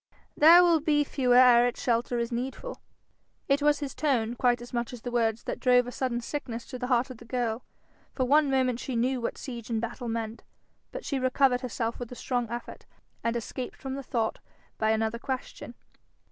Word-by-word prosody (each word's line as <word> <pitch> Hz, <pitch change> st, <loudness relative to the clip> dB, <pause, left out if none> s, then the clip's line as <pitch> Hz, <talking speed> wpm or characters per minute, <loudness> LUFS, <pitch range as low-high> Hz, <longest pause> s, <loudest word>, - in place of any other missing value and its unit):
'They 330 Hz, +4 st, +8 dB
will 340 Hz, -2 st, +4 dB
be 295 Hz, -1 st, +2 dB
fewer 255 Hz, -3 st, +1 dB
ere 245 Hz, -1 st, +7 dB
its 245 Hz, -, -4 dB
shelter 240 Hz, 0 st, 0 dB
is 235 Hz, 0 st, -2 dB
needful.' 265 Hz, -, -5 dB, 0.7 s
It 280 Hz, +1 st, +2 dB
was 295 Hz, 0 st, +3 dB
his 275 Hz, -2 st, -4 dB
tone 240 Hz, -7 st, 0 dB
quite 245 Hz, 0 st, +2 dB
as 240 Hz, +1 st, -11 dB
much 235 Hz, 0 st, -2 dB
as 240 Hz, -, -9 dB
the 245 Hz, -, -4 dB
words 230 Hz, -2 st, 0 dB
that -, -, -4 dB
drove 250 Hz, -1 st, +4 dB
a 245 Hz, -, -6 dB
sudden 245 Hz, -2 st, -2 dB
sickness 240 Hz, -3 st, -5 dB
to 255 Hz, -, -6 dB
the 250 Hz, -, -3 dB
heart 250 Hz, +1 st, +1 dB
of 255 Hz, -, -9 dB
the 235 Hz, -, -13 dB
girl: 235 Hz, -1 st, -2 dB, 0.5 s
for 260 Hz, -, +1 dB
one 290 Hz, +2 st, +4 dB
moment 255 Hz, -3 st, +1 dB
she 255 Hz, 0 st, -4 dB
knew 250 Hz, +2 st, 0 dB
what 235 Hz, -, -3 dB
siege 235 Hz, -4 st, -7 dB
and 225 Hz, -1 st, 0 dB
battle 240 Hz, +2 st, -5 dB
meant. 225 Hz, 0 st, -4 dB, 0.5 s
But -, -, -7 dB
she 275 Hz, -, -1 dB
recovered 255 Hz, 0 st, +2 dB
herself 235 Hz, -2 st, -3 dB
with 245 Hz, -1 st, -6 dB
a -, -, -7 dB
strong 245 Hz, -2 st, -2 dB
effort, 240 Hz, +1 st, -7 dB, 0.4 s
and 230 Hz, 0 st, 0 dB
escaped 240 Hz, +2 st, -5 dB
from 265 Hz, -1 st, -5 dB
the 275 Hz, -, -4 dB
thought 235 Hz, -4 st, -2 dB, 0.4 s
by 220 Hz, -, +2 dB
another 220 Hz, +1 st, 0 dB
question. 255 Hz, -2 st, -6 dB
245 Hz, 205 wpm, -28 LUFS, 235-265 Hz, 0.7 s, They